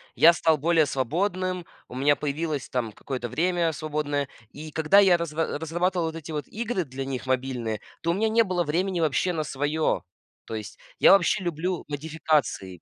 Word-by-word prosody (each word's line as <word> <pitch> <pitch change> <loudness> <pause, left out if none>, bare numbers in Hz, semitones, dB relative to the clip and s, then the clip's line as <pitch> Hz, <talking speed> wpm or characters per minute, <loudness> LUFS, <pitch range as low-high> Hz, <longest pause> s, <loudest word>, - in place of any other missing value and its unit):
я 170 +2 +7
стал 160 -1 +2
более 160 +1 +3
свободным, 180 - -1 0.2
у 125 - -10
меня 145 +2 +3
появилось 150 0 -3
там 120 -4 -2
какое-то 125 +3 -5
время 170 +1 +1
свободное. 150 -2 -2 0.2
И 155 +1 -9
когда 160 +6 +4
я 185 -3 +6
разра 165 -2 -2
разрабатывал 175 +2 0
вот 160 - -5
эти 160 0 -7
вот 150 -4 -4
игры 225 -4 -2
для 135 -1 -6
них 130 -3 -4
мобильные, 125 -4 -2 0.2
то 170 - +1
у - - +1
меня 220 +4 +1
не 230 +1 +4
было 180 -4 0
времени 175 +4 -1
вообще 165 +3 +1
на 155 - -1
своё. 150 +2 0 0.4
То 115 - -5
есть 105 -1 -7 0.2
я - - +7
вообще 195 0 +4
люблю 175 +1 -2
модификации. 150 - -1
155 Hz, 180 wpm, -26 LUFS, 140-175 Hz, 0.4 s, я